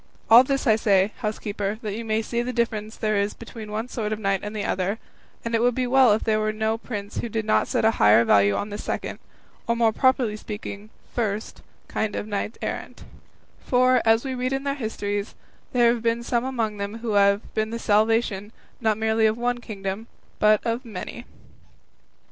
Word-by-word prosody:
All 235 +3 +10
this 275 +1 -1
I 220 -4 +4
say, 200 -2 +3
housekeeper, 210 -1 -3
that 210 -2 -3
you 230 +3 -4
may 220 0 0
see 235 +2 -1
the 245 +1 -3
difference 225 -2 -2
there 215 -2 0
is 200 +1 0
between 230 -1 -9
the 210 - -8
one 220 +3 -2
sort 220 -4 -3
of 215 - -1
knight 195 -2 0
and 210 +1 -6
the 205 - -2
other; 190 +3 -1 0.5
and 230 - -3
it 230 - +2
would 245 0 +3
be 255 - 0
well 255 -1 +5
if 215 - 0
there 215 -1 +2
were 215 0 0
no 220 +1 0
prince 205 -4 -6
who 235 - -3
did 220 0 -2
not 215 - +2
set - - 0
a 220 - +6
higher 105 +3 +6
value 100 -1 +4
on 205 - -2
this 205 - -5
second, - - -4 0.5
or 235 - +2
more 230 -1 +3
properly 255 -3 +2
speaking 210 -1 -7 0.2
first, 220 -2 -3 0.3
kind 215 -1 -2
of - - -3
knights 210 +1 -3
errant; - - -5 0.6
for, 255 0 +3
as 225 +3 +3
we 265 - -2
read 255 +1 -1
in 270 0 -2
their 280 0 0
histories, 205 -5 -3 0.4
there 240 -1 +4
have 235 - -4
been 230 +1 0
some 235 0 0
among 230 -5 -2
them 200 +2 -4
who 225 - -1
have 200 0 +2
been 215 0 0
the 230 - -4
salvation, 215 -2 +1 0.3
not 220 -3 +1
merely 220 0 +2
of 215 +1 0
one 245 0 -1
kingdom, 200 -1 -5 0.3
but 215 0 +4
of 230 +2 -1
many." 230 +2 -7
220 Hz, 205 wpm, -24 LUFS, 210-235 Hz, 0.6 s, All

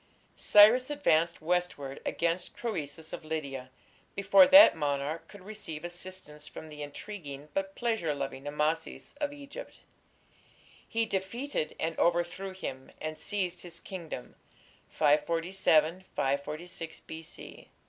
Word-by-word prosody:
Cyrus 225 +6 +7
advanced 170 - +2
westward 165 -5 -1
against 170 +2 -1
Croesus 160 -8 -4
of - - -5
Lydia 140 -5 -4 0.5
before 195 -1 +7
that 290 +2 +10
monarch 145 +1 -2
could 205 -3 -13
receive 190 -7 -7
assistance 175 -4 -7
from 160 - -9
the 150 -1 -9
intriguing 145 -2 -7
but 195 0 -2
pleasure 225 -11 0
loving 135 0 -5
Amasis 155 +2 -2
of 290 0 0
Egypt; 285 0 -10 1.1
he 225 0 +1
defeated 200 - -2
and 160 0 -1
overthrew 175 +3 +1
him, 130 -8 -6
and 155 0 -4
seized 185 -1 -2
his 170 -1 -9
kingdom 165 -10 -7 0.6
(547 165 +3 +2
546 155 +5 -3
B. 160 0 -10
170 Hz, 115 wpm, -30 LUFS, 150-195 Hz, 1.1 s, that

